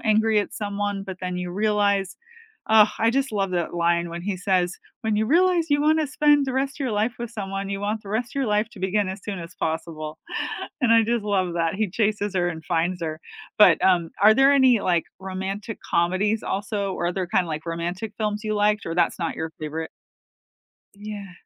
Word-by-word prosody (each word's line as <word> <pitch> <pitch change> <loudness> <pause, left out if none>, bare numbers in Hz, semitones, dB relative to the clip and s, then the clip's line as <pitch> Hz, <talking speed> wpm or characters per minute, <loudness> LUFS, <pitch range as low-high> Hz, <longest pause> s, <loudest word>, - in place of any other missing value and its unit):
angry 220 0 +3
at 205 - -5
someone, 205 -1 -3
but 190 -2 -7
then 180 -1 -3
you 180 0 -4
realize 200 -1 +1 0.5
Ugh, 220 -1 +7
I 225 - +4
just 270 0 0
love 195 -2 0
that 175 -1 -1
line 170 0 +1
when 170 +1 -6
he 200 0 -2
says, 180 -1 0 0.2
"When 220 -2 0
you 215 +1 +1
realize 345 +2 +3
you 290 0 +3
wanna 310 0 +3
spend 290 0 +3
the 265 - -2
rest 270 +1 -1
of - - -15
your 250 - -1
life 215 +3 +1
with 235 -1 -5
someone, 195 -2 -4
you 200 0 -3
want 210 +1 -2
the 195 - -10
rest 225 +3 -2
of - - -11
your 275 -2 +1
life 210 +1 +1
to 215 - -14
begin 190 +1 0
as 190 +1 -5
soon 200 -3 -4
as 170 +1 -9
possible," 160 -1 -4 0.6
and 245 -4 +4
I 230 0 +6
just 230 -1 -1
love 190 -4 0
that 165 0 0
he 205 -1 -1
chases 205 -1 0
her 175 -1 +2
and 160 -2 -6
finds 175 +1 -1
her. 155 -1 -4 0.4
But, 210 - +6
um, 175 -3 +3
are 215 +1 +8
there 270 +3 +5
any, 260 -4 +5
like, 175 -3 +1
romantic 190 +3 -5
comedies 185 +6 +1
also, 200 0 -2
or 175 - -2
other 180 +1 -2
kinda 175 +1 +1
like 155 +1 -5
romantic 175 +6 -3
films 210 0 -2
you 215 0 -1
liked, 210 0 +1
or 165 - -3
that's 175 - +1
not 165 -2 -2
your 160 0 -3
favorite? 155 +1 -4 1.0
Yeah. 205 -2 -8
200 Hz, 210 wpm, -24 LUFS, 180-220 Hz, 1.0 s, are